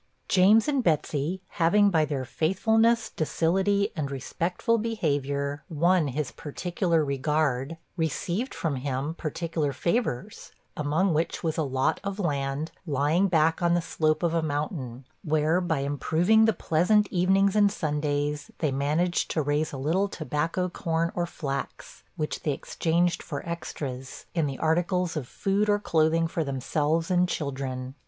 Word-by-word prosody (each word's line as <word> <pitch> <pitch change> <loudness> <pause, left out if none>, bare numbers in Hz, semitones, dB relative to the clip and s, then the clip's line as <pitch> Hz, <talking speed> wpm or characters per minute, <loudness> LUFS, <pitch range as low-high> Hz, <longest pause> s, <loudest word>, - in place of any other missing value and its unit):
James 200 +6 +5
and 280 -4 +1
Betsey 160 +1 0 0.2
having, 200 +5 +5
by 160 -3 +3
their 140 -3 -3
faithfulness, 220 - +2
docility, 195 +6 +1
and 150 -4 -2
respectful 170 - -1
behavior, 145 -9 -1
won 170 +1 +2
his 140 +2 -3
particular 170 +1 -1
regard, 140 +1 0 0.2
received 175 - -2
from 155 -5 -2
him 135 +3 -2
particular 160 -2 -2
favors 170 - -2 0.2
among 155 +5 +1
which 160 +2 -1
was 160 -2 0
a - - 0
lot 135 -2 0
of 200 -1 -3
land, 145 -4 -2 0.2
lying 150 +6 +2
back 165 -2 +2
on 170 0 +3
the - - +3
slope 155 -1 0
of 170 -1 +1
a 165 - +2
mountain, 145 - -3 0.2
where, 155 +2 +2
by 160 -6 0
improving 165 +10 +3
the 225 - +4
pleasant 205 +4 +2
evenings 190 +2 +3
and 205 -1 +5
Sundays, 150 -3 -2
they 155 -4 0
managed 150 +6 0
to 160 - 0
raise 145 +2 0
a 140 - -6
little 165 +9 +1
tobacco, 165 +1 -2
corn, 165 -1 -1
or 175 -1 -1
flax; 140 -4 -5
which 150 - -3
they 150 - 0
exchanged 170 +5 0
for 145 +1 -6
extras, 135 -6 -6
in 165 -4 +1
the 135 -2 -4
articles 175 +2 0
of 145 -6 -3
food 200 +7 0
or 205 - +4
clothing 165 -3 +2
for 165 0 -2
themselves 150 +5 -1
and 180 0 +3
children. 130 -4 -4
160 Hz, 145 wpm, -27 LUFS, 145-180 Hz, 0.2 s, James